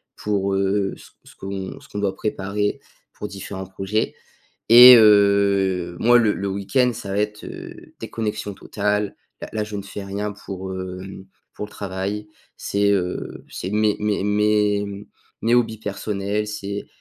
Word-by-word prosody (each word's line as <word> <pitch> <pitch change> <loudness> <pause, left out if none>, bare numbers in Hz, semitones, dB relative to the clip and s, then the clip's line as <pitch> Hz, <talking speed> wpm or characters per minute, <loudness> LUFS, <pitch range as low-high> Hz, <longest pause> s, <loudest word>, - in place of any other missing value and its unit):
pour, 100 -2 -1
heu, 95 0 +1
ce - - -15 0.2
ce - - -16
qu'on 95 -1 -6
ce - - -18
qu'on 105 - -5
doit 100 -2 -1
préparer 105 0 -2 0.3
pour 105 - -6
différents 95 -1 -7
projets. 95 +3 -2 0.5
Et 125 +2 +11
heu, 100 -4 +4
moi, 120 +1 +6
le 110 -3 +3
le 100 0 -3
week-end, 110 +6 +1
ça 100 -3 -7
va 100 - -1
être, 105 0 -2
heu, - - -10
déconnexion 105 -2 -4
totale. 105 +1 -1 0.3
Là - - -6
là, 110 - -1
je 105 0 -6
ne 100 - -4
fais 100 +1 -7
rien 100 +2 -3
pour, 95 -2 -7
heu, 95 0 -5 0.6
pour - - -5
le - - -19
travail. 100 +1 -4 0.3
C'est, 100 0 +1
heu, 90 -3 -2
c'est 95 - -5
mes 105 0 +2
mes 105 -2 0
mes 105 -1 +1 0.4
mes 115 +2 +3
hobbies 115 -2 +2
personnels, 105 0 -3
c'est 100 -1 -5
100 Hz, 160 wpm, -22 LUFS, 95-105 Hz, 0.6 s, Et